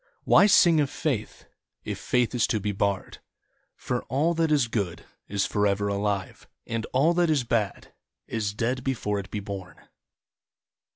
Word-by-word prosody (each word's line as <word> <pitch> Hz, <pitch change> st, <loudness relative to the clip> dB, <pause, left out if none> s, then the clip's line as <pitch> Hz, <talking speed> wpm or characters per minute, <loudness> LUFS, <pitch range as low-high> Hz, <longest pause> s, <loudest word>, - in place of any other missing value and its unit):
Why 200 Hz, -, +6 dB
sing 170 Hz, -5 st, +6 dB
of 145 Hz, -2 st, +1 dB
Faith, 130 Hz, -9 st, -3 dB, 0.4 s
If -, -, -5 dB
Faith 125 Hz, -1 st, +1 dB
is 120 Hz, -2 st, +2 dB
to 110 Hz, -, 0 dB
be 105 Hz, +1 st, -2 dB
barred. 100 Hz, 0 st, -2 dB, 0.6 s
For -, -, -3 dB
all 145 Hz, +7 st, +1 dB
that 165 Hz, -1 st, +1 dB
is 140 Hz, -5 st, +3 dB
good 100 Hz, -7 st, -3 dB, 0.2 s
Is 100 Hz, -1 st, 0 dB
forever 100 Hz, 0 st, +1 dB
alive, 100 Hz, -1 st, -2 dB, 0.2 s
And 115 Hz, -1 st, -3 dB
all 145 Hz, +6 st, +3 dB
that 175 Hz, -1 st, +2 dB
is 145 Hz, -5 st, +2 dB
bad 115 Hz, -4 st, -2 dB, 0.3 s
Is 105 Hz, -3 st, -3 dB
dead 125 Hz, +3 st, -1 dB
before 110 Hz, -6 st, -1 dB
it 95 Hz, -1 st, -8 dB
be 105 Hz, -, -4 dB
born. 100 Hz, -2 st, -8 dB
115 Hz, 160 wpm, -26 LUFS, 100-135 Hz, 0.6 s, Why